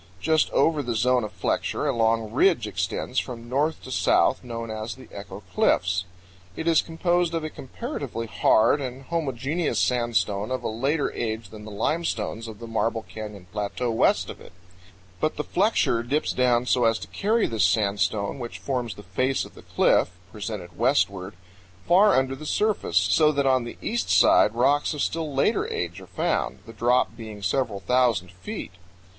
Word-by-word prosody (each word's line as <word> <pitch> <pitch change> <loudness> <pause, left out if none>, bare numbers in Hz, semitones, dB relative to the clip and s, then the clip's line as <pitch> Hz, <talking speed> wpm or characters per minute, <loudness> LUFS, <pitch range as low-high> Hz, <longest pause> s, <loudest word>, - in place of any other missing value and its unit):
Just 160 +6 +2
over 155 -2 +2
the 120 -4 -3
zone 125 +2 +2
of 105 - -5
flexure - - -1
a - - +1
long 115 -1 +1
ridge 165 - +3
extends 100 +5 -2
from 120 -2 -6
north 145 +6 0
to 130 - -8
south, 130 - +2
known 115 -2 -5
as 110 +1 -5
the - - -14
Echo - - -9
Cliffs. 95 +1 +2 0.5
It 160 - -4
is 165 -1 +5
composed 175 +1 0
of 165 - -2
a 155 - -4
comparatively 135 - -5
hard 115 +4 +3
and 130 0 -6
homogeneous 150 +1 -2
sandstone 110 -4 +1
of 130 0 -3
a - - -1
later 135 +7 0
age 110 -3 -4
than 105 -1 -11
the - - -8
limestones 115 -2 -2
of 110 -2 -8
the 115 - -9
Marble 115 0 -1
Canyon 105 -4 -8
Plateau 105 +4 -2
west 115 - +2
of - - -13
it; - - -14 0.7
but 155 - 0
the 150 - -1
flexure 185 - +2
dips 140 +6 -1
down 125 -1 +2
so 125 -1 +2
as 115 -1 +3
to 90 - -8
carry 215 - +1
this 110 -4 0
sandstone 100 +2 +1
which 120 -2 -6
forms 125 -6 -3
the 105 - -11
face 130 +9 0
of - - -14
the - - -13
cliff - - +2 0.2
(presented 105 -4 -6
westward) 100 -7 +1 0.5
far 195 +4 +6
under 130 0 +1
the 150 +3 -8
surface, 210 - 0
so 150 - +4
that 140 -2 0
on 130 -2 +3
the 120 - -8
east 110 -6 -1
side 90 +4 +5
rocks 145 +5 +2
of 145 - -3
still 160 -2 -2
later 140 +11 +1
age 90 +2 -3
are 95 - -12
found, - - -1
the 115 - -11
drop 120 0 +2
being 110 -3 -9
several 110 -1 0
thousand 115 -4 +2
feet. 90 +1 -7
120 Hz, 180 wpm, -25 LUFS, 105-140 Hz, 0.7 s, far